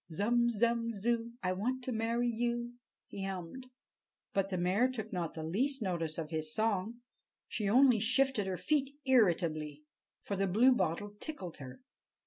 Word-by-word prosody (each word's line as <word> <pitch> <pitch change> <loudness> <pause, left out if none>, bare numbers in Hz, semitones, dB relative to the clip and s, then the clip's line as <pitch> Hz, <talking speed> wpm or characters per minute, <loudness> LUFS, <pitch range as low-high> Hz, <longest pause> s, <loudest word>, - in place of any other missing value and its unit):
"Zum, 235 +7 +2
zum, 230 +1 +1
zoo, 230 +2 -1
I 185 - +1
want 250 +7 -2
to 255 - -3
marry 230 +1 0
you!" 240 +1 -1 0.3
he 195 - -7
hummed. 195 +7 -6 0.7
But 195 0 +1
the 185 - -2
mare 190 +8 +2
took 220 -5 -6
not 175 -3 -3
the 160 - -5
least 250 - 0
notice 165 -5 -2
of 160 -1 -5
his 155 -1 -2
song. 220 +1 -1 0.5
She 205 -3 -2
only 250 0 +6
shifted 250 -1 +2
her 185 -1 -2
feet 280 - 0
irritably, 165 - +2 0.4
for 200 - -3
the 195 0 0
Bluebottle 205 -2 +2
tickled 190 - -6
her. 135 - -10
215 Hz, 155 wpm, -33 LUFS, 180-240 Hz, 0.7 s, only